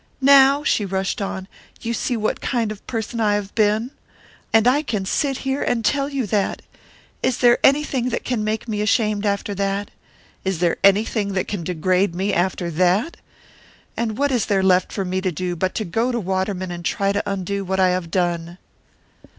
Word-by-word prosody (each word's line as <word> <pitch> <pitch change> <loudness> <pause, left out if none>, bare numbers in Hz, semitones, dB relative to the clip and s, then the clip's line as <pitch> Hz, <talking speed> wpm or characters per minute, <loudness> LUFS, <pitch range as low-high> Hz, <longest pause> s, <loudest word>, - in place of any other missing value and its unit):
Now," 275 +1 +6
she 225 - +1
rushed 195 +1 -2
on 190 -1 -4 0.3
"you 235 0 -3
see 240 +1 -1
what 215 0 -1
kind 230 -4 -1
of 210 - -7
a - - -17
person 230 0 -3
I 210 -2 +2
have 205 -1 -4
been! 215 +3 +1 0.6
And 225 +1 +4
I 270 +4 +4
can 210 -10 -3
sit 270 +6 0
here, 270 +1 -1
and 230 -2 0
tell 280 +4 +1
you 275 -4 -2
that! 205 -1 -1 0.6
Is 250 - +1
there 240 -1 +4
anything 270 -3 +3
that 235 - -3
can 240 -4 -1
make 215 +2 -2
me 210 -2 -2
ashamed 210 0 +1
after 200 0 -1
that? 200 +1 -2 0.5
Is 190 -2 -1
there 170 0 +1
anything 200 +1 +3
that 185 - -1
can 200 -5 -4
degrade 180 +2 0
me 195 +3 -1
after 175 -1 0
that? 185 - +1 0.8
And 225 -2 -2
what 285 0 +1
is 245 -5 0
there 195 -2 +2
left 185 -1 +3
for 195 - -3
me 185 +1 -2
to 185 -1 0
do 180 +1 -3
but 185 +4 -1
go 235 +5 +1
to 240 - -1
Waterman 190 -1 -2
and 175 0 -6
try 195 +3 0
to 200 0 0
undo 195 0 -2
what 190 0 -2
I 185 -1 +5
have 180 -2 -2
done?" 175 -1 -1
205 Hz, 195 wpm, -21 LUFS, 185-235 Hz, 0.8 s, Now